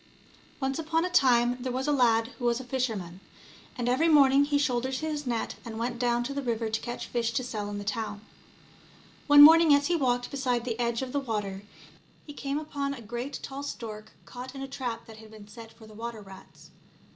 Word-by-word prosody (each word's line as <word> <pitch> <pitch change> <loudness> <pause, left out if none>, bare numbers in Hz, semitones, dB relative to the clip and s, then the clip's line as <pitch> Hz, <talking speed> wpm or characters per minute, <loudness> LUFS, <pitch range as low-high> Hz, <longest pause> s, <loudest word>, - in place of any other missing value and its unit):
NCE 270 +3 -1
upon 325 +1 0
a 365 - -3
time 245 -6 +4
there 255 0 -3
was 260 +3 -2
a - - +2
lad 230 -4 +3
who 245 - -4
was 240 0 +2
a - - -7
fisher 255 -2 -1
man, 180 -2 -8 0.6
and 245 -1 -2
every 260 +7 +2
morning 280 -3 +6
he 290 0 +1
shouldered 260 -2 0
his 300 -1 -3
net, 235 -2 -2
and 225 -2 -7
went 235 +1 -3
down 240 -1 +1
to 270 +3 -4
the 280 - -3
river 230 -3 -2
to 220 - -1
catch 240 - -5
fish 235 -1 -1
to 255 - -1
sell 215 -4 -4
in 205 - -5
the 205 - -5
town. 205 0 -4 1.1
One 290 0 +10
morning 320 -1 +8
as 285 0 +1
he 350 - +1
walked 245 -5 0
beside 250 -3 -1
the 235 -1 -3
edge 235 +1 0
of 255 - -6
the 285 - 0
water, 210 -7 -3 0.6
he 295 - -9
came 280 0 -3
upon 285 -2 -3
a 240 - -10
great 240 +6 -5
tall 275 +1 -6
stork 220 -6 -7
caught 255 +2 -9
in 270 - -6
a - - -5
trap 255 -4 -5
that 220 -1 -13
had 220 0 -13
been 215 -1 -13
set 225 +1 -12
for 225 - -16
the 215 - -14
water 225 0 -6
rats. 195 -1 -15
245 Hz, 225 wpm, -28 LUFS, 225-275 Hz, 1.1 s, One